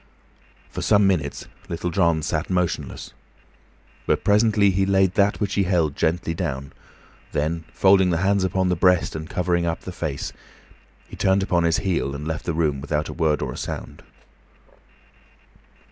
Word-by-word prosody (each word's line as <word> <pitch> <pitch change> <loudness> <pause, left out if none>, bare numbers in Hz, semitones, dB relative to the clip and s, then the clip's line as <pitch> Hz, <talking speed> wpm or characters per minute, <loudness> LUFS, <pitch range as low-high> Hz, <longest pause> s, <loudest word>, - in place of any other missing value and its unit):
For - - -5
some 105 -1 +4
minutes 80 -7 -1 0.2
Little 85 +1 -3
John 85 -3 +2
sat 75 0 -2
motionless, 90 -2 -2 0.9
but - - +1
presently 105 -1 +4
he 95 +1 +1
laid 95 -1 +2
that 100 +1 +2
which 105 -2 -1
he 100 - +2
held 85 -6 +1
gently 80 +1 0
down, 70 -6 -4 0.6
then, 80 +2 -1
folding 95 -1 +4
the 85 - +1
hands 95 +2 +2
upon 95 0 0
the 90 - +2
breast 90 0 +2
and 80 0 -6
covering 85 -1 0
up 85 0 -2
the 95 - -7
face, 75 -6 -4 0.7
he - - -10
turned 95 0 +2
upon 85 -3 +1
his 85 -1 +2
heel 90 -8 -1
and 75 +2 -6
left 80 +1 -4
the 85 - -1
room 75 -4 0
without 75 +1 -2
a - - -5
word 80 -3 0
or - - -4
a - - -9
sound. - - -6
85 Hz, 165 wpm, -23 LUFS, 80-95 Hz, 0.9 s, some